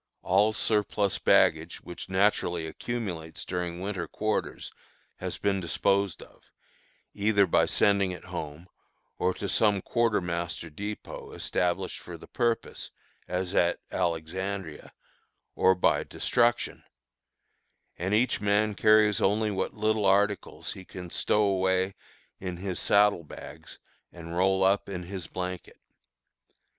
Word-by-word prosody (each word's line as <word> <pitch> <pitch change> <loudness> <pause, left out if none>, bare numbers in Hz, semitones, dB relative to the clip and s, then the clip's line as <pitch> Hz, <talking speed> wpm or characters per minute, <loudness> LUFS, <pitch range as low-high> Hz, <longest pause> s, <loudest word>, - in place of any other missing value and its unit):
All 100 +4 +4
surplus 105 -2 +1
baggage, 80 +2 +3
which 90 +1 -9
naturally 95 -3 +1
accumulates 85 -3 -5
during 90 -1 -3
winter 95 -3 -3
quarters, 110 0 -2 0.5
has - - -4
been 100 -1 0
disposed 100 +2 0
of, - - -21 0.6
either 100 -1 +3
by 90 - +3
sending 100 -2 +3
it 90 - -7
home, 80 -2 -6 0.5
or 90 - +2
to 100 - -4
some 105 -1 +3
quartermaster 90 -8 -1
dépôt, 105 +6 -7
established 90 +1 -1
for 85 -1 -9
the - - -12
purpose, 120 -2 -1 0.4
as 90 0 -2
at 85 0 +3
Alexandria, 85 +1 -3 0.6
or 95 - +4
by 90 - +2
destruction; 120 -1 0 1.1
and 95 +4 0
each 115 0 +2
man 105 +1 +2
carries 105 -1 +4
only 105 +2 +2
what 95 -1 -2
little 110 -1 +1
articles 100 +1 +1
he 95 - -8
can 90 -1 -9
stow 105 - +2
away 95 -1 +1 0.5
in 90 -2 -5
his 95 0 -4
saddle 100 -4 +4
bags 75 - -11 0.3
and 85 -1 -8
roll 95 +1 +3
up 100 +1 +2
in 90 -2 -4
his 90 -1 -6
blanket. 90 -1 -6
95 Hz, 125 wpm, -28 LUFS, 90-105 Hz, 1.1 s, All